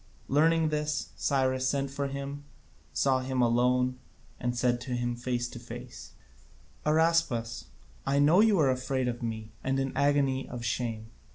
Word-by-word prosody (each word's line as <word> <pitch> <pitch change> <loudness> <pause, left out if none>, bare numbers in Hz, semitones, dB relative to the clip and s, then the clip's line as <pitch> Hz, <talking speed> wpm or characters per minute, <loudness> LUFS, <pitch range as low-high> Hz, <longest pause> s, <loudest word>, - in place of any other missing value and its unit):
Learning 160 +3 +3
this, 150 0 -1
Cyrus 130 -2 +1
sent 140 -1 -1
for 140 0 -2
him, 140 +1 -5 0.5
saw 135 -1 +2
him 130 0 -2
alone, 125 +2 +2 0.4
and 120 0 -2
said 120 0 +1
to 125 -1 -3
him 120 0 -1
face 120 0 -2
to 120 - -9
face: 120 - -9 0.7
"Araspas, 155 -8 +2 0.4
I 135 +1 +1
know 155 +7 +6
that 225 - +6
you 210 -3 +3
are 140 -5 +4
afraid 130 0 -1
of 120 -1 -3
me 110 -2 -4
and 135 +1 0
in 135 0 0
an - - -10
agony 140 -2 +2
of 120 -1 -6
shame. 110 -1 -3
130 Hz, 165 wpm, -29 LUFS, 120-140 Hz, 0.7 s, know